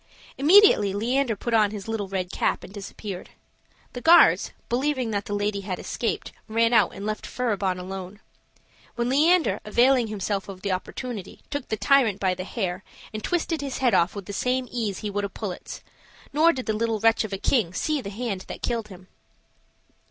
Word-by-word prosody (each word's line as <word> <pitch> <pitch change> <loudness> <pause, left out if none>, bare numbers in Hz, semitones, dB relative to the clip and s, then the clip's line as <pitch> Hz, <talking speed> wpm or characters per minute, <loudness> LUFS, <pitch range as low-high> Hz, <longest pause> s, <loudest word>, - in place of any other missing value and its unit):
Immediately 290 - +6
Leander 240 +3 0
put 235 +4 -4
on 215 -2 +4
his 205 -1 -7
little 220 -3 -2
red 185 -1 -3
cap - - 0
and - - -11
disappeared. 200 -1 -7 0.6
The 245 - -6
guards, 340 +4 +6 0.2
believing 255 -1 0
that 200 -1 -2
the 205 - -3
lady 205 0 -1
had 190 -2 -4
escaped, - - -3 0.2
ran 230 +1 +2
out 230 - +4
and 200 - -6
left 215 0 -3
Furibon 205 -7 -1
alone; 190 +2 -7 0.8
when 240 0 -1
Leander, 300 - +3
availing 245 +3 +3
himself 205 -1 -3
of 190 -1 -9
the 200 - -1
opportunity, 200 +2 -5
took 285 -3 -3
the 220 - -2
tyrant 220 -1 +3
by 190 -2 +1
the 180 0 -6
hair, 190 -4 -3 0.3
and 215 - -5
twisted 335 -3 -1
his 275 -3 -4
head 255 -3 +2
off 170 +4 +3
with 200 -2 -6
the 200 - -7
same 250 +4 0
ease 215 -6 -2
he 210 - -3
would 205 0 -2
a 200 - -2
pullet's; 195 -3 -7 0.5
nor 320 +3 +5
did 260 -6 -5
the 220 - 0
little 225 0 -1
wretch 225 +1 +3
of 215 - -6
a 195 - -2
king 215 -4 +1
see 300 +10 -1
that 200 - -6
hand 205 -3 -4
that - - -8
killed 230 -3 -1
him. 185 -2 -13
215 Hz, 190 wpm, -25 LUFS, 195-250 Hz, 0.8 s, Immediately